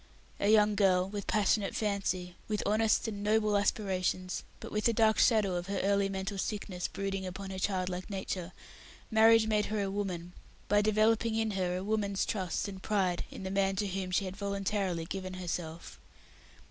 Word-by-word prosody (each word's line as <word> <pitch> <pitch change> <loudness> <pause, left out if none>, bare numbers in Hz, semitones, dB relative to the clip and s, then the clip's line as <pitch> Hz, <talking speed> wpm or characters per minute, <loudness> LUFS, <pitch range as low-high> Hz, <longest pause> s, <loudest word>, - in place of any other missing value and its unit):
A 200 - +2
young 210 -1 +5
girl, 185 -3 +3
with 200 0 -6
passionate 210 0 +1
fancy, 195 -4 -1
with 210 -1 -1
honest 220 +2 +2
and 205 -2 -4
noble 210 0 +2
aspiration, 185 -3 0 0.3
but - - -8
with 210 0 -1
the 235 - +4
dark 220 -1 +3
shadow 215 -5 +4
of 175 0 -3
her 200 - -2
early 200 0 +2
mental 195 +1 -3
sickness 190 -3 -3
brooding 195 -1 -3
upon 190 +1 -6
her 190 - -5
childlike 185 -1 -2
nature, 190 -2 -4 0.6
Marriage 225 0 +6
made 215 -1 +1
her 215 0 -2
a 195 - -2
woman, 180 -4 -4 0.3
by 205 0 +4
developing 220 +1 +2
in 220 -1 0
her 180 -2 -1
a 185 - -4
woman's 200 -2 0
trust 185 -3 -2
and 190 -2 -8
pride 190 -5 0
in - - -9
the 190 - -4
man 195 0 +1
to 205 +2 -1
whom 190 -1 -3
she 185 +2 +1
had 185 0 -5
voluntarily 200 -3 -2
given 185 +1 -5
herself. 170 -2 -5
195 Hz, 180 wpm, -31 LUFS, 185-210 Hz, 0.6 s, Marriage